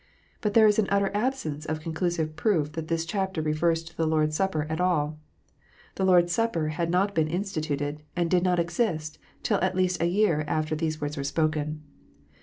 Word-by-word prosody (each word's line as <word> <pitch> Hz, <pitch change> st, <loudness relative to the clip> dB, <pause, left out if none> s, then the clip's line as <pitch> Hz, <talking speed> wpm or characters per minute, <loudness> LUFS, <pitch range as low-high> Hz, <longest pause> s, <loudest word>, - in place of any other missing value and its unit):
But 210 Hz, -1 st, -1 dB
there 225 Hz, -1 st, +7 dB
is 210 Hz, 0 st, +4 dB
an 205 Hz, -, +2 dB
utter 200 Hz, 0 st, +2 dB
absence 205 Hz, -, -2 dB
of 155 Hz, 0 st, -2 dB
conclusive 160 Hz, 0 st, -2 dB
proof 160 Hz, -4 st, +1 dB
that 160 Hz, 0 st, -5 dB
this 165 Hz, 0 st, -1 dB
chapter 190 Hz, 0 st, -2 dB
refers 160 Hz, +2 st, +1 dB
to 165 Hz, 0 st, -13 dB
the 165 Hz, -1 st, 0 dB
Lord 155 Hz, -1 st, +2 dB
s 155 Hz, -, -5 dB
Supper 190 Hz, -6 st, 0 dB
at 160 Hz, +2 st, -2 dB
all! 155 Hz, -4 st, +1 dB, 0.7 s
The 190 Hz, -, -2 dB
Lord 180 Hz, -2 st, +6 dB
s 175 Hz, -, -5 dB
Supper 175 Hz, -9 st, 0 dB
had 165 Hz, +2 st, -2 dB
not 190 Hz, +4 st, +2 dB
been 160 Hz, -4 st, +2 dB
instituted, 155 Hz, -5 st, -2 dB
and 175 Hz, -1 st, +1 dB
did 180 Hz, +1 st, +3 dB
not 180 Hz, 0 st, +2 dB
exist, 170 Hz, -3 st, -1 dB, 0.2 s
till -, -, +1 dB
at 185 Hz, 0 st, +1 dB
least 185 Hz, -2 st, +1 dB
a 170 Hz, -, +3 dB
year 175 Hz, -4 st, +2 dB
after 155 Hz, +1 st, -1 dB
these 155 Hz, 0 st, -2 dB
words 145 Hz, 0 st, -4 dB
were 140 Hz, -, -2 dB
spoken. 155 Hz, +1 st, -1 dB
165 Hz, 205 wpm, -27 LUFS, 155-185 Hz, 0.7 s, there